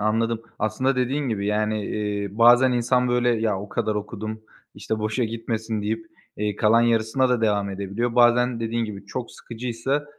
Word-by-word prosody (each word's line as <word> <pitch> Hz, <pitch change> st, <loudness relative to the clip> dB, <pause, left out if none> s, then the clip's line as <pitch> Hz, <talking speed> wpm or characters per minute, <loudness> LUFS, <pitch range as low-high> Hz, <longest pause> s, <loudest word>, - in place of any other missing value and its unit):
Anladım. 115 Hz, +2 st, 0 dB, 0.2 s
Aslında 125 Hz, +5 st, 0 dB
dediğin 130 Hz, +2 st, 0 dB
gibi, 100 Hz, -3 st, -2 dB
yani, 105 Hz, 0 st, 0 dB
eee, 105 Hz, -1 st, -2 dB
bazen 120 Hz, +2 st, +6 dB
insan, 125 Hz, +1 st, +2 dB
böyle, 120 Hz, 0 st, +2 dB
ya, 110 Hz, -4 st, +1 dB
o 105 Hz, -, -8 dB
kadar 110 Hz, -, -1 dB
okudum, 110 Hz, +1 st, -5 dB, 0.3 s
işte, 110 Hz, -, -3 dB
boşa 110 Hz, +3 st, -1 dB
gitmesin 110 Hz, -1 st, -3 dB
deyip, 110 Hz, +11 st, -3 dB, 0.3 s
eee, 105 Hz, 0 st, -2 dB
kalan 115 Hz, +1 st, +4 dB
yarısına 120 Hz, +3 st, +2 dB
da 125 Hz, -2 st, +1 dB
devam 105 Hz, -2 st, +1 dB
edebiliyor. 100 Hz, +5 st, -3 dB
Bazen 120 Hz, 0 st, +4 dB
dediğin 115 Hz, 0 st, -1 dB
gibi 100 Hz, -2 st, -8 dB
çok 120 Hz, +4 st, -5 dB
sıkıcıysa, 125 Hz, +4 st, -3 dB
115 Hz, 165 wpm, -24 LUFS, 105-120 Hz, 0.3 s, bazen